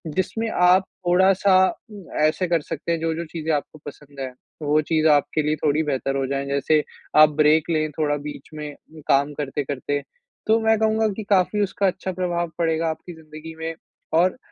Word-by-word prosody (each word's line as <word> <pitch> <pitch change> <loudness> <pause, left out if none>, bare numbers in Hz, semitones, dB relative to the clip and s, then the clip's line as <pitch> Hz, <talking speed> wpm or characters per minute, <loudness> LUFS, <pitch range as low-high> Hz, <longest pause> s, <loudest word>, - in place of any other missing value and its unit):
जिसमें 220 +4 -1
आप 180 -1 +4 0.2
थोड़ा-सा 190 +2 +4 0.4
उम, 200 -3 -11 0.2
ऐसे 155 +4 +2
कर 170 -2 +1
सकते 165 +2 -5
हैं 165 - 0
जो-जो 165 +1 -2
चीज़ें 160 0 -3
आपको 150 +1 -5
पसंद 145 -1 -11
हैं, 130 -1 -5 0.3
वो 150 +1 +3
चीज़ 155 +1 +1
आपके 150 +1 +3
लिए 150 +1 +1
थोड़ी 150 +1 +2
बेहतर 135 -2 -2
हो 135 - 0
जाएँ। 140 +1 -2
जैसे 140 +2 +2 0.4
आप 155 - +6
ब्रेक 155 +2 +4
लें 155 -1 +1
थोड़ा 145 -1 +1
बीच 145 - -9
में 150 -1 -6 0.4
काम 140 +2 +3
करते-करते। 145 0 -3 0.5
तो 220 +1 +4
मैं 220 0 +3
कहूँगा 220 0 +2
कि 220 - -4
काफ़ी 200 +1 +2
उसका 200 0 0
अच्छा 185 0 -2
प्रभाव 175 -2 -2
पड़ेगा 165 -1 +1
आपकी 160 +2 -6
ज़िंदगी 160 0 -11
में 165 0 -3 0.5
और 185 +6 +2
160 Hz, 180 wpm, -23 LUFS, 150-180 Hz, 0.5 s, आप